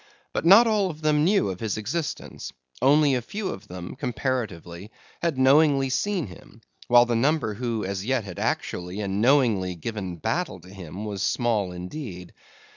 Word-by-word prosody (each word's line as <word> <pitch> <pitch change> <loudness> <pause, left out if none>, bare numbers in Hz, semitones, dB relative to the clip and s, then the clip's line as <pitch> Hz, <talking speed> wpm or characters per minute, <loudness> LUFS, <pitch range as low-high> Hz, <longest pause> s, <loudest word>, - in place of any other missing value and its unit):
But - - -2
not 200 +6 +9
all 210 -4 +2
of 155 -2 -9
them 150 -1 +3
knew 190 - +3
of 90 - -7
his 110 -3 -2
existence; 145 +9 -4 0.3
only 145 +1 +5
a 125 - +1
few 195 - -4
of 100 +2 -7
them, 90 -1 -8
comparatively, 115 - -4 0.3
had 165 -5 0
knowingly 135 0 +4
seen 190 +5 0
him; 105 +3 -14 0.3
while 120 0 +6
the 120 -1 -1
number 135 -1 +1
who 115 -1 -3
as 95 0 -3
yet 125 +1 0
had 95 -4 -8
actually 90 +3 -2
and 100 0 -2
knowingly 115 -8 +3
given 95 0 -5
battle 85 - -2
to 90 - -15
him, 95 +2 -8
was 100 -3 -4
small 110 -5 0
indeed. 90 - -7
120 Hz, 170 wpm, -25 LUFS, 95-145 Hz, 0.3 s, not